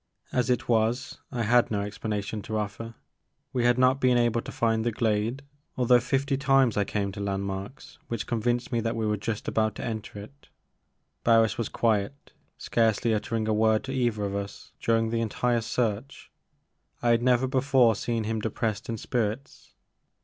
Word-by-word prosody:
As 125 -2 0
it 125 - 0
was, 115 +3 0
I 120 -3 -2
had 120 +2 +4
no 105 -2 -1
explanation 105 +1 -4
to 110 - -8
ofFer. 110 +2 -4 0.6
We 125 -2 +1
had 120 0 +4
not 130 +1 +3
been 125 -1 +4
able 120 -1 +2
to - - -8
find 115 -1 +1
the 120 - 0
glade 110 +4 -1 0.3
although 125 -1 +5
fifty 135 +3 0
times 135 -4 +3
I 100 - +1
came 100 -1 -2
to 100 - -9
landmarks 100 +3 -5
which 115 -3 -3
convinced 120 +2 -1
me 120 - +1
that 115 +1 -2
we 110 -1 -1
were 105 0 +1
just 105 +1 -4
about 110 -1 +1
to - - -5
enter 110 -2 -5
it, 140 +8 -12 0.7
Barris 115 -1 +4
was 115 - -1
quiet, 115 +4 -1 0.2
scarcely 115 0 +1
uttering 110 +1 -1
a 110 - +2
word 110 0 +3
to 135 - -5
either 120 -5 0
of 100 -1 -2
us 100 0 -6
dur 115 0 +3
ing 115 0 0
the 115 0 0
entire 120 +2 0
search. 115 +3 -3 0.7
I 120 - +3
had 115 0 +4
never 125 +1 +3
before 130 -3 +3
seen 115 +2 -2
him 110 +1 -2
depressed 110 0 -3
in 115 - -2
spirits. 120 +4 -4
115 Hz, 180 wpm, -27 LUFS, 105-125 Hz, 0.7 s, although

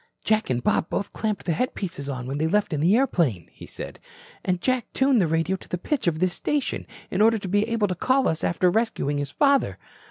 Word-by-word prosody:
"Jack 220 0 +1
and 120 -1 0
Bob - - +1
both 200 - -3
clamped 215 -3 -2
the 175 - 0
headpieces 170 - -3
on 130 -3 -4
when 135 +3 -3
they 160 - +1
left 205 0 +1
in 150 - 0
the 175 +7 +4
airplane," 160 - +1
he - - -12
said. - - -8 0.4
"And 180 -1 0
Jack 255 +3 -1
tuned 265 -4 +3
the 175 - +2
radio 165 +3 +1
to - - -16
the 180 - -2
pitch 270 - -2
of 160 -2 +2
this 180 +1 +1
station, 290 +6 -2 0.2
in 185 - +1
order 225 +1 +5
to 200 - -6
be 205 +3 +1
able 230 -3 +1
to 185 - -1
call 260 +9 +2
us 160 - -1
after 180 +1 +2
rescuing 175 -10 0
his 145 -1 -2
father. 280 - +2
185 Hz, 230 wpm, -25 LUFS, 160-230 Hz, 0.4 s, order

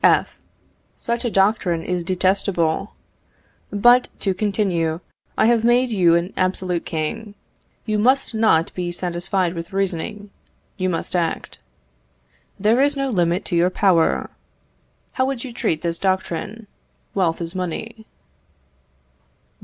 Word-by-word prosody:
F. - - +4 0.6
Such 235 +1 -2
a - - +1
doctrine 195 -5 +1
is 180 -1 -2
detestable. 185 -1 0 0.8
But, 240 +5 +5
to 195 - +1
continue, 185 -5 0 0.4
I - - +4
have 230 -1 +3
made 240 +1 +3
you 175 -5 +4
an 170 +3 -1
absolute 185 -2 -1
king. 175 +7 -4 0.5
You 215 -1 0
must 260 +4 +2
not 215 -8 +2
be 175 -1 -3
satisfied 175 +1 -1
with 170 0 -7
reasoning, 195 +2 -3 0.4
you 185 -2 -1
must 170 +1 -3
act. 170 -2 -2 1.0
There 220 +6 +3
is 285 0 +3
no 275 0 -1
limit 175 -4 +1
to 175 - -2
your 170 +2 +4
power. 185 -3 +2 0.8
How 260 0 0
would 265 -3 -3
you 255 -3 -7
treat 160 -9 -1
this 170 -1 -1
doctrine, 190 +3 -2 0.5
wealth 175 -4 +1
is 170 0 -5
money? 220 +5 -5
190 Hz, 130 wpm, -21 LUFS, 170-220 Hz, 1.0 s, But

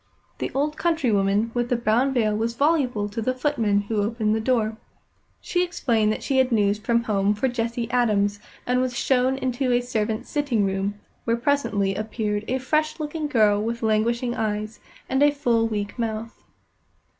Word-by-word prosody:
The - - -2
old 300 +2 0
countrywoman 225 - +1
with 240 0 -1
the 245 - +2
brown 235 +3 +2
veil 220 -5 +1
was 230 +2 -1
voluble 265 -7 +1
to 225 +3 -4
the 255 +3 -1
footman 230 -7 +1
who 205 +1 -1
opened 215 0 0
the - - 0
door. 220 -2 0 0.6
She 355 0 0
explained 235 -11 +1
that - - -4
she 265 -1 +1
had 260 -1 +2
news 205 -2 +2
from 235 +1 +1
home 205 -2 +1
for 225 +6 0
Jessie 235 -1 -2
Adams, 205 -4 +2 0.3
and 250 +1 +1
was 250 -1 -2
shown 260 0 +2
into 255 0 -1
a 245 - +4
servant's 220 -3 -2
sitting 275 -9 +1
room, 195 +1 -1 0.3
where 230 0 +1
presently 235 -7 +1
appeared 215 0 -3
a 260 - 0
fresh 305 +4 0
looking 305 0 -3
girl 215 -6 +3
with 230 +2 -3
languishing 235 +3 +1
eyes, 215 -1 -3 0.3
and 265 +1 0
a 290 - +7
full, 240 -6 +1
weak 205 +1 -4
mouth. 225 0 -4
230 Hz, 175 wpm, -24 LUFS, 215-255 Hz, 0.6 s, a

